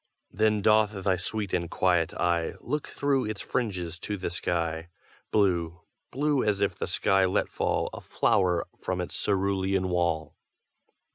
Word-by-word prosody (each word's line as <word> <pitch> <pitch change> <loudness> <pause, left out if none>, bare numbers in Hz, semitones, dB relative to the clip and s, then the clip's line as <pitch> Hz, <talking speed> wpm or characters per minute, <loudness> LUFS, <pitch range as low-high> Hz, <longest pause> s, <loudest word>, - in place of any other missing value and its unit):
Then 105 0 +2
doth 110 -1 +4
thy 95 -1 +3
sweet 100 +3 -3
and 85 -1 0
quiet 90 -3 +2
eye 85 -1 +1
Look 150 +4 -3
through 140 -2 0
its 105 -2 -4
fringes 90 -8 -3
to 105 +3 -4
the 90 -2 -3
sky, 85 -1 -2 0.4
Blue 85 -5 +1 0.3
blue 145 +1 +1
as 105 -2 +1
if 100 -2 +1
that - - -2
sky 95 -1 +2
let 95 - +1
fall - - 0
A - - -7
flower 90 -4 +2
from 95 -1 -2
its 90 - -4
cerulean 95 -1 +1
wall. 85 -3 0
95 Hz, 150 wpm, -28 LUFS, 85-105 Hz, 0.4 s, doth